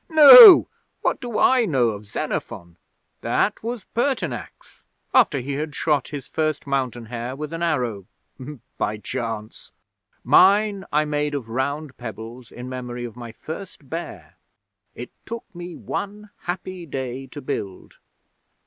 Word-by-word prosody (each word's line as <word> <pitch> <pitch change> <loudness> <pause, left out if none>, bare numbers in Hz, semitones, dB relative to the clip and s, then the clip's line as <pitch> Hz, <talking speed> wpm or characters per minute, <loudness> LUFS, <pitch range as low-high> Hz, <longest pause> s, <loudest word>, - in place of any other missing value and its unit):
'No! 345 - +10 0.3
What - - -1
do 240 -3 -4
I 255 -3 +4
know 130 - +2
of 105 -1 -7
Xenophon? 85 -3 -5 0.4
That 120 - 0
was 230 -2 -5
Pertinax 215 - -3 0.3
after 140 - +4
he 130 +3 -5
had 150 +2 -4
shot 150 -5 0
his 145 -3 -7
first 155 -1 -2
mountain 130 -4 -2
hare 120 +2 -6
with 150 +2 -7
an 165 - -5
arrow 125 - -2 0.7
by 105 - -1
chance! 110 0 -6 0.5
Mine 200 0 +4
I 150 +1 +2
made 150 -1 -2
of 125 -5 -5
round 140 +4 -3
pebbles, 115 +1 -9
in 125 +1 -9
memory 125 -1 -6
of 115 -2 -9
my 120 -2 -9
first 160 - -10
bear. 170 +1 -7 0.6
It - - -8 0.2
took 230 0 -6
me 175 0 -8
one 205 +1 -6
happy 180 0 -5
day 130 -1 -5
to 145 - -10
build.' 100 -8 -6
145 Hz, 140 wpm, -22 LUFS, 120-180 Hz, 0.7 s, No